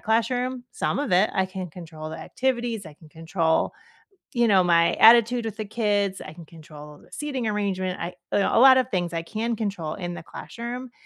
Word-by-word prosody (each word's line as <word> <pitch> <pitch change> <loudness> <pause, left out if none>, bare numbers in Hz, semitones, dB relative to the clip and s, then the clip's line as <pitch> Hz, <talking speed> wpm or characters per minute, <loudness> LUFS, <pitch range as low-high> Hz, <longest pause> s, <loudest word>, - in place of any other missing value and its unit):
classroom? 245 +3 -1
Some - - -1
of 285 -6 -2
it. 185 +4 +4
I 190 - +1
can 185 -1 -6
control 160 -2 -9
the - - -7
activities, 240 -5 -2
I 155 - -11
can 155 +1 -18
control," 165 +1 0 0.6
you 240 -2 +2
know, 195 -4 +5
"my 170 -1 +3
attitude 235 +1 +6
with 220 -1 -5
the 215 - -4
kids, 205 -3 -1
I - - -8
can 165 0 -12
control 150 -2 -13
the - - -22
seating 280 -5 -4
arrangement, 195 -3 -2
I 170 +2 -4 0.2
a 200 - +2
lot 260 +1 +8
of 255 -1 +1
things 175 -5 -1
I 165 - -1
can 225 +7 -3
control 195 -8 -3
in 175 -3 -5
the 175 - -8
classroom," 240 +7 -7
200 Hz, 195 wpm, -24 LUFS, 170-235 Hz, 0.6 s, lot